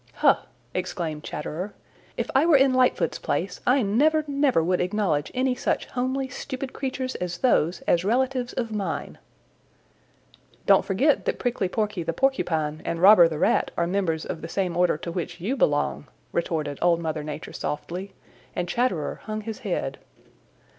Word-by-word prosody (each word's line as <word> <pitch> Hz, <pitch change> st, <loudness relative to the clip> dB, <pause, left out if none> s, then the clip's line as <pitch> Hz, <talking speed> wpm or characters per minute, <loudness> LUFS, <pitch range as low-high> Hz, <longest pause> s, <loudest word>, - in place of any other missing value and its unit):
"Huh!" -, -, +4 dB, 0.3 s
exclaimed 170 Hz, -4 st, -3 dB
Chatterer. 180 Hz, +7 st, -5 dB, 0.4 s
"If -, -, -2 dB
I 270 Hz, +2 st, +5 dB
were 330 Hz, -, +6 dB
in 270 Hz, -1 st, +4 dB
Lightfoot's 255 Hz, -1 st, +2 dB
place -, -, -2 dB
I 255 Hz, +1 st, +4 dB
never, 300 Hz, +10 st, +3 dB
never 280 Hz, -, +2 dB
would 180 Hz, +2 st, +1 dB
acknowledge 180 Hz, -6 st, 0 dB
any 255 Hz, 0 st, +2 dB
such -, -, -1 dB
homely, 260 Hz, +2 st, -2 dB
stupid 260 Hz, +1 st, -6 dB
creatures 260 Hz, -1 st, -3 dB
as 175 Hz, -1 st, -4 dB
those 175 Hz, -7 st, +2 dB
as 170 Hz, 0 st, +2 dB
relatives 250 Hz, +3 st, 0 dB
of 230 Hz, -3 st, -3 dB
mine." 195 Hz, -6 st, -3 dB, 1.5 s
"Don't -, -, +6 dB
forget 270 Hz, +10 st, +2 dB
that -, -, 0 dB
Prickly 235 Hz, -7 st, -1 dB
Porky 210 Hz, -2 st, -1 dB
the 165 Hz, 0 st, -2 dB
Porcupine 160 Hz, -, 0 dB
and 165 Hz, -, -2 dB
Robber 185 Hz, -1 st, +8 dB
the 160 Hz, -2 st, -4 dB
Rat -, -, +2 dB
are 170 Hz, -, +2 dB
members 170 Hz, -3 st, -1 dB
of -, -, -5 dB
the 165 Hz, -, -6 dB
same 185 Hz, -2 st, -1 dB
order 175 Hz, -3 st, +3 dB
to 170 Hz, +2 st, -6 dB
which 170 Hz, 0 st, -4 dB
you 215 Hz, +10 st, -1 dB
belong," -, -, +1 dB, 0.2 s
retorted 155 Hz, -4 st, -2 dB
Old 170 Hz, -1 st, +3 dB
Mother 160 Hz, -2 st, -2 dB
Nature 150 Hz, 0 st, -6 dB
softly, 180 Hz, +6 st, -5 dB, 0.4 s
and 175 Hz, -, -1 dB
Chatterer 180 Hz, -, -1 dB
hung 215 Hz, 0 st, -3 dB
his 220 Hz, 0 st, -6 dB
head. -, -, -3 dB
195 Hz, 160 wpm, -25 LUFS, 170-255 Hz, 1.5 s, Robber